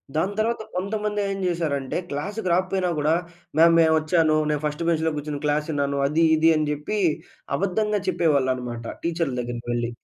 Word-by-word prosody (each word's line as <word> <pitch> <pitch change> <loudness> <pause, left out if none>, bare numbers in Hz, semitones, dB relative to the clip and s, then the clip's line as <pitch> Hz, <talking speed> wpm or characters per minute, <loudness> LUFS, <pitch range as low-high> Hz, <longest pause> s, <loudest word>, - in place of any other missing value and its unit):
దాని 185 +6 0
తర్వాత 230 +1 0
కొంతమంది 210 +2 -2
ఏం 195 - -2
చేశారంటే 150 -6 -1
క్లాస్‌కి 190 +8 -4
రాకపోయినా 185 0 +1
కూడా, 150 +2 +2 0.4
"మ్యామ్! 165 +1 +6
నేనొచ్చాను. 160 0 +3
నేను 150 -1 0
ఫస్ట్ 150 +2 -2
బెంచ్‌లో 160 -1 +1
కూర్చొని 145 0 -4
క్లాస్ 150 0 +1
విన్నాను. 140 -1 -1
అది 155 +3 +2
ఇది" 160 +1 +4
అని 155 0 +1
చెప్పి 150 +8 -3 0.6
అబద్ధంగా 205 +5 0
చెప్పేవాళ్ళన్నమాట. 130 -9 0 0.2
టీచర్ల 165 -4 -1
దగ్గరికెళ్లి. 120 -1 -3
160 Hz, 145 wpm, -24 LUFS, 145-185 Hz, 0.6 s, మ్యామ్